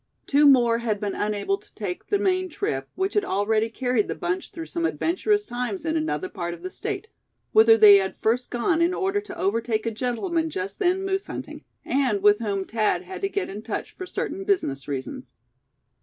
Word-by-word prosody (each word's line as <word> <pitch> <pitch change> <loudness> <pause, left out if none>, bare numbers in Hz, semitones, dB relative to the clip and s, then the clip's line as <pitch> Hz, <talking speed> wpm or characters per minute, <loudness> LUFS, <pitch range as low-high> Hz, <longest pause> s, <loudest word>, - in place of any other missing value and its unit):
Two 290 +1 +5
more 240 -4 +5
had 220 -3 -1
been 205 -1 -2
unable 210 - -1
to - - -22
take 190 -5 -5
the 410 - +2
Maine 370 -2 +1
trip, 135 - -3
which 380 +2 -1
had 415 - +2
already 215 - +1
carried 245 -2 0
the - - -3
bunch 355 +1 -3
through 330 -1 -7
some 335 +1 -3
adventurous 395 +5 +1
times 240 -3 -4
in 320 0 0
another 320 +4 -1
part 175 - -5
of 170 - -17
the 185 - -5
State, 420 -1 -4 0.4
whither 225 +1 +7
they 210 -2 +9
had 190 -1 -2
first 240 +3 0
gone 320 +8 +1
in 345 +2 +2
order 390 +1 0
to 390 -3 -10
overtake 225 +1 0
a 230 - 0
gentleman 260 - -1
just 400 +4 -5
then 375 0 +1
moose 385 0 -1
hunting, - - -7 0.2
and 255 -7 +1
with 205 0 +6
whom 200 -4 -2
Thad 220 - 0
had 375 +1 -8
to 390 - 0
get 400 0 -2
in 205 +2 -7
touch 220 0 -4
for 370 - -8
certain 390 - -3
business 255 - 0
reasons. 145 - -6
250 Hz, 200 wpm, -25 LUFS, -, 0.4 s, they